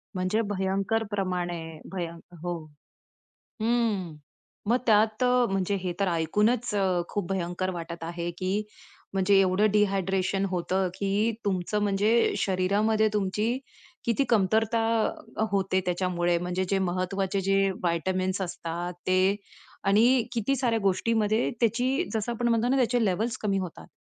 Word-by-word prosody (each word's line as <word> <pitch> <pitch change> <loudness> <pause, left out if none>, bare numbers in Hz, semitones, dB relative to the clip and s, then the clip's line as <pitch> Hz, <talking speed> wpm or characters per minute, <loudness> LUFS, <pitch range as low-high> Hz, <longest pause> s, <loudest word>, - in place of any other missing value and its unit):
म्हणजे 185 +5 +1
भयंकर 195 +3 0
प्रमाणे 180 -3 -2 0.3
भय 175 -3 -2 0.3
हो, 175 0 -2 1.1
हं, 220 -8 0 0.5
मग 240 +2 +4
त्यात 215 +3 +3
अ, 250 -1 +4
म्हणजे 195 +1 0
हे 180 -1 -2
तर 200 - +2
ऐकूनच 210 +8 +1 0.4
खूप 205 -5 -2
भयंकर 185 0 -2
वाटत 170 -1 -6
आहे 170 +1 -4
की 190 +3 -1 0.5
म्हणजे 195 +1 +4
एवढं 195 +3 +3
डिहायड्रेशन 195 -1 +1
होतं 185 +1 0
की 200 +4 0
तुमचं 195 +2 0
म्हणजे 205 +2 +2 0.3
शरीरामध्ये 205 +4 +2
तुमची 210 +5 0 0.5
किती 235 +4 +2
कमतरता 220 +1 +2 0.7
होते 190 -1 +1
त्याच्यामुळे 175 -1 +1
म्हणजे 180 +2 -2
जे 195 -1 +2
महत्त्वाचे 190 +2 -1
जे 195 0 +2
व्हिटॅमिन्स 185 +3 0
असतात 175 0 -4
ते 185 +2 +3 0.5
आणि 230 +5 +5
किती 240 +3 0
साऱ्या 235 -3 +1
गोष्टींमध्ये 215 +3 +1
त्याची 250 +8 +1
जसं 220 +2 -1
आपण 240 +1 -1
म्हणतो 230 0 +2
ना, 270 - +3
त्याचे 245 -1 +2
लेव्हल्स 215 +5 0
कमी 200 -2 0
होतात. 180 -3 -7
195 Hz, 125 wpm, -27 LUFS, 185-220 Hz, 1.1 s, आणि